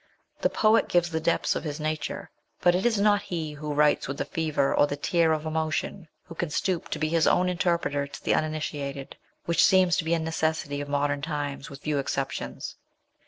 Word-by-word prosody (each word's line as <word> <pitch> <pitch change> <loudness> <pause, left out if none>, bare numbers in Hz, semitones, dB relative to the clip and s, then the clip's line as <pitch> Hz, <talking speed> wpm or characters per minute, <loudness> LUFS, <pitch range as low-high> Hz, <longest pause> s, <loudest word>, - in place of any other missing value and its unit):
The - - +3
poet 220 +1 +3
gives 175 -1 +2
the 160 - 0
depths 165 +1 +1
of - - -3
his 150 -2 -4
nature, 155 -1 -3 0.3
but 175 - +4
it 185 +6 +2
is 225 -3 +1
not 205 0 +4
he 160 -3 -4
who 150 0 -5
writes 150 0 +3
with 135 +1 -4
the - - -2
fever 155 -4 0
or 145 - +4
the 145 - -4
tear 165 +2 +2
of 155 0 -1
emotion 160 +3 -2 0.2
who - - -11
can 170 0 -3
stoop 175 +3 -1
to - - -2
be 155 - 0
his 165 0 +3
own 180 - +3
interpreter 170 -5 0
to 140 - -11
the - - +2
uninitiated, 145 -3 -3 0.3
which 170 - +3
seems 185 -2 +5
to - - 0
be 165 +1 +1
a - - -1
necessity 160 -3 -1
of 145 - -6
modern 145 0 0
times, 145 -2 -4
with 140 0 -11
few 150 -2 0
exceptions. 135 0 -4
155 Hz, 210 wpm, -27 LUFS, 145-170 Hz, 0.3 s, seems